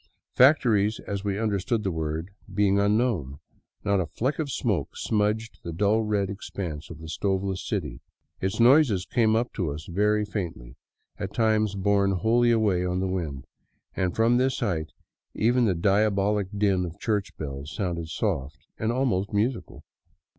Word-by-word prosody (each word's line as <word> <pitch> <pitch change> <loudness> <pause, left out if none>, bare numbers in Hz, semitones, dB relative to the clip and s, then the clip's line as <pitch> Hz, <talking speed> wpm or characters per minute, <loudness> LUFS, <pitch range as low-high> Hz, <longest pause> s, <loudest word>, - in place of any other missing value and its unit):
Factories, 115 -6 +4
as 100 -1 -4
we 100 -1 -1
understand 105 +1 0
the 95 - 0
word, 80 +2 -3 0.2
being 100 0 +2
unknown, 100 - +1 0.5
not 100 -1 +2
a 90 - 0
^ - - -25
fleck 130 - -2
of 155 -3 -1
smoke - - -1
smudged 110 +1 -1
the 85 - -6
dull 105 +6 +2
red 105 -2 0
expanse 90 -6 -6
of 80 - -8
the 80 +1 -10
stoveless 95 +3 -1
city. 75 - -3 0.4
Its 95 +4 -2
noises 120 - +5
came 110 -1 +2
up 120 +2 0
to 90 -7 -2
us 75 +2 -6
very 105 +4 +1
faintly, 85 - -5 0.4
at 100 -1 -5
times 110 -2 +2
borne 100 0 +2
wholly 115 +5 +3
away 105 -6 +2
on 90 0 -1
the 95 - 0
wind, 80 -8 -3 0.5
and 90 -1 -1
from 115 +2 +3
this 130 +1 +1
height 80 - -2 0.4
even 120 +2 +3
the 95 -4 +2
diabolic 100 +2 +2
din 100 -3 +2
of 85 -2 -6
church 105 -4 -2
bells 70 0 -6
sounded 85 -3 -3
soft 70 -3 -2 0.2
and 110 +1 0
almost 120 -6 0
musical. 105 -1 -2
100 Hz, 160 wpm, -26 LUFS, 90-110 Hz, 0.5 s, noises